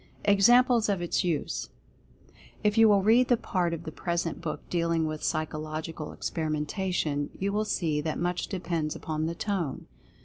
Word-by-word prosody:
EXAMPLES 235 +3 +5
OF 200 -2 +1
ITS 175 -1 0
USE. 170 -5 -2 0.9
If 210 0 +2
you 225 -1 +7
will 200 -2 +4
read 235 +4 +5
the 245 - +4
part 180 -5 -1
of 165 0 -4
the 160 - -6
present 170 0 -2
book 160 -2 -5
dealing 170 -2 +1
with 155 -1 -4
Psychological 155 0 -3
Experimentation, 155 -1 -2
you 200 +1 -1
will 215 +1 +1
see 160 -7 0
that 155 +1 -2
much 175 0 -1
depends 170 -5 -2
upon 155 0 -3
the 170 - -3
Tone. 180 -8 -2
170 Hz, 160 wpm, -28 LUFS, 155-200 Hz, 0.9 s, you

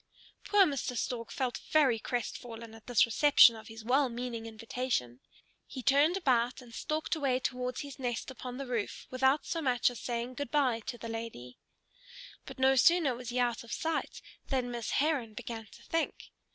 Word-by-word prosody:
Poor 410 -2 +6
Mr. 270 -5 -2
Stork 230 -1 -3
felt 255 -3 -2
very 270 -7 +4
crestfallen 230 -1 -5
at 225 -1 -15
this 245 -3 +5
reception 240 0 +6
of 220 - -11
his 225 0 -10
well 265 +2 +3
meaning 235 -1 -5
invitation. 225 - -3 0.5
He 260 - -7
turned 285 +7 +4
about 250 -8 +1
and 240 -3 -13
stalked 310 +7 -2
away 270 -5 +1
towards 250 0 -2
his 285 -2 -9
nest 245 0 -3
upon 250 -1 -7
the 275 - -4
roof, 235 -5 -3
without 265 +3 +2
so 330 - -2
much 250 -3 +2
as 245 - -9
saying 240 +1 -3
good 285 0 -4
by 260 -6 +2
to 240 - -4
the 230 - -7
lady. 225 - -7 0.9
But - - -9
no 265 +1 +4
sooner 320 0 +5
was 245 0 -7
he 245 - -3
out 240 -2 +1
of 235 - -12
sight 325 -1 -2 0.2
than 255 -3 -1
Miss 235 -2 -4
Heron 275 -7 0
began 225 0 -6
to - - -16
think. 330 0 -2
250 Hz, 180 wpm, -31 LUFS, 230-275 Hz, 0.9 s, Poor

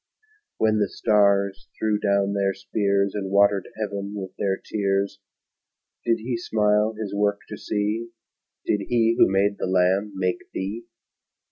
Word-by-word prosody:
When 110 -1 +2
the 100 -2 +1
stars 100 -2 +2
threw 105 -1 0
down 100 -1 +1
their 100 -1 0
spears, 100 0 0
And 100 -2 -3
watered 100 0 +3
heaven 100 -1 -4
with 95 -2 -6
their 95 -1 0
tears, 100 -1 -1 0.8
Did 115 -1 +2
He 120 +2 -3
smile 105 -1 +1
His 105 -3 -4
work 100 0 +1
to 105 - -5
see? 110 +2 -2 0.6
Did 105 - +1
He 115 -1 +3
who - - +6
made 100 +1 +1
the - - -1
lamb 95 +3 +2
make 90 -1 -2
thee? 105 +5 -4
100 Hz, 145 wpm, -24 LUFS, 100-105 Hz, 0.8 s, who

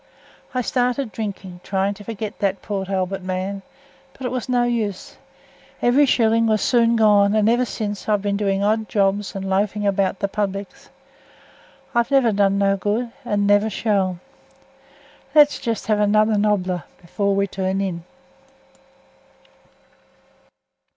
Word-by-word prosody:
I 255 - +1
started 250 0 -1
drinking, 195 -5 -6
trying 195 +1 -1
to 205 - -12
forget 215 -1 -6
that 195 -1 -1
Port 195 -2 -4
Albert 190 0 -2
man, 185 +2 -4 0.5
but 265 - -9
it 250 - -2
was 255 -1 -4
no 245 -1 +2
use. 225 -5 -2 0.6
Every 270 +4 +4
shilling 230 -2 +3
was 215 -2 +1
soon 235 -2 +3
gone, 210 -2 +4
and 215 -1 +3
eversince 225 -4 -1
I've 205 -2 +1
been 200 -1 0
doing 200 -1 0
odd 215 0 0
jobs 200 0 0
and 195 0 -4
loafing 205 +2 0
about 195 -1 +1
the 200 - -1
publics. 200 -1 -4 1.0
I've 235 0 +1
never 270 -5 +3
done 200 -1 +2
no 195 0 +2
good 220 +5 -2
and 205 -4 0
never 205 +2 +3
shall. 195 -4 0 1.2
Let's 295 -1 +6
have - - -15
just 230 -5 -3
another 215 0 +3
nobbler 190 -5 0 0.2
afore 200 +3 -1
we 200 0 +2
turn 190 0 -2
in." 180 -4 -3
205 Hz, 140 wpm, -21 LUFS, 195-225 Hz, 1.2 s, Let's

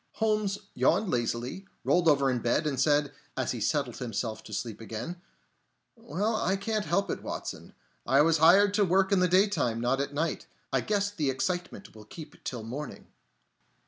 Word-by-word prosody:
Holmes 215 -3 0 0.2
yawned 215 - +2
lazily, 120 +9 -2 0.2
rolled 175 -1 +2
over 140 -3 +4
in 125 - 0
bed, 120 +7 +1
and 140 -4 -1
said, 145 0 +2 0.2
as 130 - 0
he 120 - -4
settled 140 0 0
himself 115 -2 -3
to - - -11
sleep 110 +1 -4
again: 120 +11 -6 0.7
"Well, 225 -1 -2
I 190 -2 +1
can't 210 +1 -2
help 200 -2 0
it, - - -4
Watson. - - -6 0.3
I 135 +3 +4
was 165 0 +3
hired 195 +6 +6
to 205 0 +3
work 190 +1 +2
in 200 - +4
the 180 - +4
daytime, 185 - +2
not 125 +3 +1
at 140 0 -3
night. 155 +3 -2 0.3
I - - +3
guess 205 -1 0
the 155 -9 -1
excitement 180 +8 -3
will 110 -1 -13
keep 150 +6 -11
till 120 -3 -4
morning." 135 +7 -7
155 Hz, 175 wpm, -29 LUFS, 125-195 Hz, 0.7 s, hired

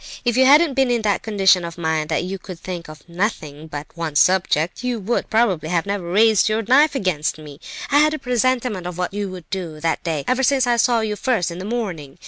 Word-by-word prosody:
If 240 -1 +1
you 260 +1 +5
hadn't 295 +2 +5
been 265 -1 +2
in 240 -2 0
that 205 -2 +1
condition 195 -4 +3
of 170 0 -7
mind 160 -2 -1
that 160 - 0
you 190 +2 -5
could 185 -2 -9
think 175 -3 -7
of 155 0 -13
nothing 170 -5 -4
but 145 -1 -6
one 165 -3 -5
subject, 175 - +2
you 250 -2 -2
would, 220 +4 -2
probably, 200 -9 +1
never 170 -2 0
have 200 -1 -2
raised 210 +5 +3
your 220 +1 0
knife 280 +7 +4
against 170 - -1
me. 150 -2 -12 0.3
I 285 - +5
had 305 +1 +3
a - - -4
presentiment 250 - -1
of 180 -1 -7
what 180 +1 -3
you 205 -1 -3
would 180 -4 -10
do, 170 -5 -5
that 165 +1 -1
day, 160 -5 -2
ever 255 +1 +1
since 265 -1 +2
I 240 -1 +1
saw 235 0 +2
you 215 -1 -2
first 210 -6 -1
in 170 - -7
the 185 - -6
morning. 190 - -4
190 Hz, 235 wpm, -20 LUFS, 165-240 Hz, 0.3 s, you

